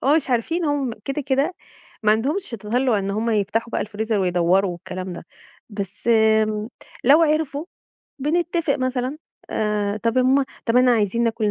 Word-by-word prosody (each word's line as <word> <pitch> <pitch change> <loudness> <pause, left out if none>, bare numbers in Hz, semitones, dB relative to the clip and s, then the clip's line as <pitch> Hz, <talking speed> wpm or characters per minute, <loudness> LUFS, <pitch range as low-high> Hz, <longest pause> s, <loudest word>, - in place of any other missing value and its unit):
هم 285 +4 +5
مش 315 - -1
عارفين 325 +9 0
هم 290 -4 0
كده، 275 +2 -2
كده 275 +6 0 0.5
ما 215 0 +5
عندهمش 280 - -1
تَطلُّع 230 +1 0
إن 195 0 -2
هم 220 +3 -1
يفتحوا 220 +2 0
بقى - - -1
الفريزر 215 +1 -2
ويدوّروا 180 +1 +2
والكلام 185 +1 -6
ده. 170 - -9 0.4
بس 200 +1 -5
امم، 220 -1 +3 0.4
لو 290 +6 +6
عرفوا 305 -2 0 0.5
بنتفق 330 +1 0
مثلًا 255 +1 -2 0.3
آآ، 210 -1 -1
"طَب 230 +3 -1
يا 255 - +5
ماما 265 +2 +3 0.2
طَب 230 0 +2
إحنا 250 0 +5
عايزين 230 +1 +1
ناكل 225 -2 0
230 Hz, 160 wpm, -22 LUFS, 210-275 Hz, 0.5 s, لو